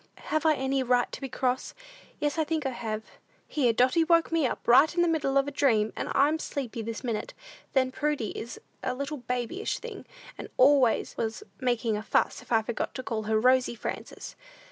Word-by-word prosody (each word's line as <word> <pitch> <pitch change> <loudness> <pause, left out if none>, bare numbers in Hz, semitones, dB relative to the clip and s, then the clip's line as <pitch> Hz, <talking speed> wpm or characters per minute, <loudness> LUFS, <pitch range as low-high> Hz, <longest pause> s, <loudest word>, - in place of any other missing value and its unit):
"Have 310 +1 +2
I 310 - +5
any 265 0 0
right 245 -1 +2
to - - -7
be 270 - -4
cross? 255 0 -1 0.4
Yes, 295 +1 -1
I - - +4
think 310 -1 -2
I 265 - 0
have. 220 -3 -4 0.4
Here 260 -6 +2
Dotty 255 +8 +3
woke 335 0 +3
me 325 -5 +2
up, - - -6
right 275 +6 +7
in 345 - +3
the - - +2
middle 295 -4 +1
of 275 0 +3
a - - -3
dream, 225 -7 +2
and - - -4
I'm 295 +3 +3
sleepy 255 -7 -4
this 225 +3 -5
minute. 230 -4 -3 0.4
Then 260 -1 +2
Prudy 290 -4 -1
is 235 - -6 0.2
a - - -2
little 280 +3 -4
babyish 250 - -3
thing, - - -9 0.3
and - - -7
always 260 -3 +4
was 225 -1 -3 0.2
making 240 -3 0
a - - -4
fuss 215 - +1
if - - -18
I 225 -1 +4
forget 230 0 -3
to 255 - -4
call 220 -3 -3
her 220 0 +2
Rosy 255 +1 +3
Frances! 220 - -6
255 Hz, 205 wpm, -28 LUFS, 235-290 Hz, 0.4 s, right